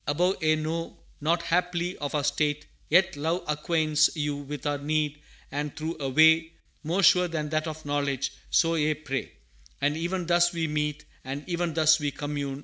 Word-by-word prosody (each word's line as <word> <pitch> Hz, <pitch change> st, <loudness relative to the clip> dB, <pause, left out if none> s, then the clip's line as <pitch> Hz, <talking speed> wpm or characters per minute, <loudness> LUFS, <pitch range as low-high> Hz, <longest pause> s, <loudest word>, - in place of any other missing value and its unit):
Above 180 Hz, +6 st, +1 dB
Ye 155 Hz, 0 st, +3 dB
know 160 Hz, +2 st, -4 dB, 0.2 s
not 165 Hz, +3 st, +1 dB
haply 175 Hz, +1 st, 0 dB
of 145 Hz, +1 st, -3 dB
our 145 Hz, -, 0 dB
state, 150 Hz, +1 st, 0 dB, 0.2 s
yet 185 Hz, +3 st, +4 dB
Love 160 Hz, +5 st, -1 dB
Acquaints 155 Hz, 0 st, +2 dB
you 150 Hz, -2 st, -1 dB
with 145 Hz, +1 st, -7 dB
our 145 Hz, -1 st, 0 dB
need, 150 Hz, 0 st, -1 dB, 0.3 s
and 145 Hz, +1 st, -4 dB
through 160 Hz, +2 st, -3 dB
a 135 Hz, -2 st, -2 dB
way 160 Hz, +3 st, +5 dB, 0.3 s
More 175 Hz, +6 st, 0 dB
sure 180 Hz, 0 st, +6 dB
than 155 Hz, -3 st, -3 dB
that 155 Hz, +1 st, -1 dB
of 155 Hz, -1 st, -7 dB
knowledge 140 Hz, -2 st, -1 dB, 0.2 s
so 165 Hz, 0 st, +3 dB
ye 155 Hz, -1 st, +1 dB
pray! 145 Hz, -3 st, -4 dB, 0.5 s
"And 145 Hz, +1 st, +1 dB
even 175 Hz, +2 st, -2 dB
thus 175 Hz, +1 st, +3 dB
we 165 Hz, -1 st, -1 dB
meet, 150 Hz, -1 st, -2 dB, 0.2 s
And 135 Hz, +3 st, -6 dB
even 170 Hz, -2 st, -2 dB
thus 155 Hz, -1 st, +5 dB
we 145 Hz, -1 st, -1 dB
commune! 145 Hz, -1 st, -4 dB
155 Hz, 180 wpm, -27 LUFS, 145-165 Hz, 0.5 s, sure